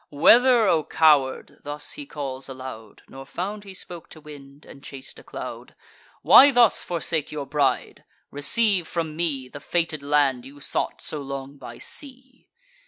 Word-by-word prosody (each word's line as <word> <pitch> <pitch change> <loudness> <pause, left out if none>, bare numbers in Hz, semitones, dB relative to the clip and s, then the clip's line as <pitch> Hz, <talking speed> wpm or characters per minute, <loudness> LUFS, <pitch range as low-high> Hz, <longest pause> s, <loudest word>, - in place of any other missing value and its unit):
"Whether, 240 - +5
O 165 -5 +2
coward?" 145 -5 +2
(thus 145 0 -5
he 290 -1 -6
calls 135 - -6
aloud, 130 -5 -10
Nor 135 0 -11
found 190 +9 -5
he 195 -2 -11
spoke 175 -2 -9
to - - -12
wind, 145 -1 -14
and 140 - -14
chas'd 135 -2 -9
a - - -15
cloud,) - - -9 0.5
"Why 280 - +9
thus 245 -5 +4
forsake 165 -3 -3
your 150 -2 -5
bride! 140 0 -1 0.3
Receive 185 +5 +2
from 160 -3 -4
me 150 -6 -1
The 145 +3 -10
fated 165 -1 -1
land 140 -3 +1
you 140 +2 -13
sought - - -3
so 150 - -3
long 140 0 -7
by 135 - -10
sea." 260 -2 -10
150 Hz, 160 wpm, -24 LUFS, 140-180 Hz, 0.5 s, Why